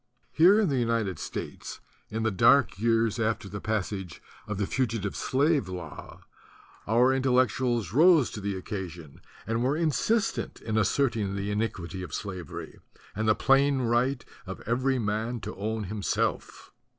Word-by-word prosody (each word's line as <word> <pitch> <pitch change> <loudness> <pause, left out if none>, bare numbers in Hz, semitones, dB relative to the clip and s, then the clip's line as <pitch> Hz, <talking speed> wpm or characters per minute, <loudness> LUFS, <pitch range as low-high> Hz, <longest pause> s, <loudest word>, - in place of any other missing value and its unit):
Here 185 +7 +6
in 210 -6 +2
the 135 -3 +1
United 115 -7 0
States - - -6 0.3
in 110 +1 -3
the 110 - +1
dark 105 +2 +4
years 115 0 +2
after 110 -2 -1
the 100 +2 -7
passage 100 -5 -3 0.3
of 105 - -3
the 100 - 0
Fugitive 115 -4 -2
Slave 140 - +1
Law, 85 -5 -8 0.7
our 120 +5 +4
Intellectuals 125 -5 +1
rose 160 -2 +5
to 105 - -6
the 100 0 -2
occasion 90 -6 -7 0.2
and 115 +2 -1
were 135 +4 +1
in 165 -2 +1
:t 225 +9 +2 0.5
in 110 -1 -1
asserting 110 -3 +1
the 100 +1 -3
iniquity 100 -4 -3
of 85 -6 -6
slavery 95 -4 -7 0.4
and 110 +2 -1
the 110 - +5
plain 135 0 +3
right 120 +2 +1 0.2
of 95 - -7
every 130 +4 0
man 110 +2 -2
to - - -6
own 110 +2 -3
himself. 100 +1 -2
110 Hz, 150 wpm, -27 LUFS, 100-130 Hz, 0.7 s, Here